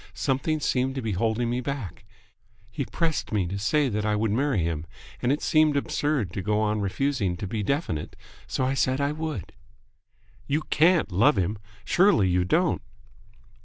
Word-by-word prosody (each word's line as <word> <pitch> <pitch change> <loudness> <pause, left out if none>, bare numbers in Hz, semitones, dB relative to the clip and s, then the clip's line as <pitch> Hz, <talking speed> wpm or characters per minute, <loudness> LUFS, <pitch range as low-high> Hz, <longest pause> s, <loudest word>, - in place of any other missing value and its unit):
Something 150 +3 0
seemed 130 -2 0
to 135 - -2
be 110 - -1
holding 110 +4 0
me 120 +1 -1
back. 125 -7 -5 0.7
He 135 +4 -3
pressed 165 +2 -2
me 105 -4 +1
to 100 +3 -4
say 145 +8 +2
that 105 -3 -1
I 105 0 +1
would 105 0 0
marry 125 - +1
him, 80 -1 -3 0.3
and 125 - +2
it 145 - -1
seemed 155 -2 +3
absurd 140 - -1
to 95 - -3
go 105 +2 0
on 105 -1 0
refusing 100 -2 -1
to 100 - -4
be 105 +3 -3
definite, 100 - -2 0.3
so 130 - -1
I 130 - +1
said 130 0 +1
I 140 0 +1
would." 155 - -5 0.9
"You 150 +2 0
can't 165 - +4
love 115 +12 +4
him? 95 +3 -1 0.3
Surely 180 - +4
you 90 0 +2
don't 90 - +1
120 Hz, 175 wpm, -26 LUFS, 100-145 Hz, 0.9 s, can't